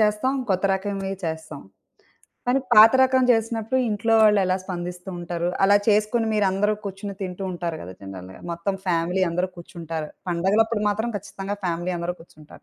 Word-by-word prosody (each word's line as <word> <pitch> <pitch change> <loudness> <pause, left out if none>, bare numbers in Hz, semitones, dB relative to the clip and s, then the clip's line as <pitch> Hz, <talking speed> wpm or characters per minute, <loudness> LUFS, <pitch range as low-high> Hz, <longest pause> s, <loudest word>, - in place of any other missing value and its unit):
చేస్తాం, 215 +5 +2
కొత్త 190 0 0
రకంవి 195 0 -3
చేస్తాం. 160 -2 -5 0.9
కానీ 260 +2 +2
పాత 220 +2 +9
రకం 260 0 +3
జేసినప్పుడు 225 +1 +1
ఇంట్లో 225 +2 +1
వాళ్ళెలా 195 -4 +4
స్పందిస్తూ 180 0 -6
ఉంటారు? 175 0 -2
అలా 200 +1 +6
చేసుకొని 215 +2 +2
మీరందరూ 205 +1 +2
కూర్చొని 200 +1 -6
తింటూ 185 0 -5
ఉంటారు 170 -2 -3
గదా! 90 +2 -8
జనరల్‌గా, 95 -1 -9
మొత్తం 170 +4 -2
ఫ్యామిలీ 175 +2 +1
అందరూ 180 +2 -1
కూర్చుంటారు. 165 -3 -6 0.2
పండగలప్పుడు 210 +6 +1
మాత్రం 220 +3 -1
ఖచ్చితంగా 200 +1 -5
ఫ్యామిలీ 175 +1 -1
అందరూ 170 +1 -3
కూర్చుంటారు. 155 -2 -16
190 Hz, 145 wpm, -24 LUFS, 170-210 Hz, 0.9 s, పాత